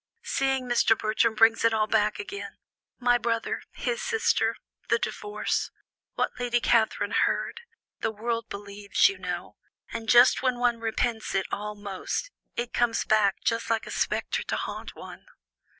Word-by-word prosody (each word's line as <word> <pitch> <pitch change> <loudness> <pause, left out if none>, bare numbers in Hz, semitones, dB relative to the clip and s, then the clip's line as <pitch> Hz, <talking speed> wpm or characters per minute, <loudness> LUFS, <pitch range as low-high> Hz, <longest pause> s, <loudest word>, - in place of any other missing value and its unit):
Seeing 265 -1 0
Mr. 235 -2 +4
Bertram 220 +1 +1
brings 225 +1 +5
it 230 -1 +4
all 215 -1 +2
back 215 -1 +1
again 405 0 -7 0.4
my 245 -1 +3
brother, 230 -1 -1
his 480 0 -2
sister 465 -2 +1 0.3
the - - +4
divorce 415 - -2 0.5
what - - 0
Lady 245 -1 +1
Catherine 230 -2 +2
heard, - - 0 0.4
the - - 0
world 230 +2 -3
believes, 200 0 +1
you 390 - -6
know - - -5 0.4
and 225 -1 -5
just 245 +1 +7
when 255 -1 +1
one 240 -1 +1
repents 225 -1 -1
it 190 - +1
all 210 +1 -4
most, 205 - -4 0.2
it 240 0 -3
comes 240 -1 +1
back 210 -2 +2
just 230 0 0
like 225 -1 +1
a - - -8
spectre - - -1
to - - -3
haunt - - -5
one." - - -11
230 Hz, 155 wpm, -27 LUFS, 215-245 Hz, 0.5 s, just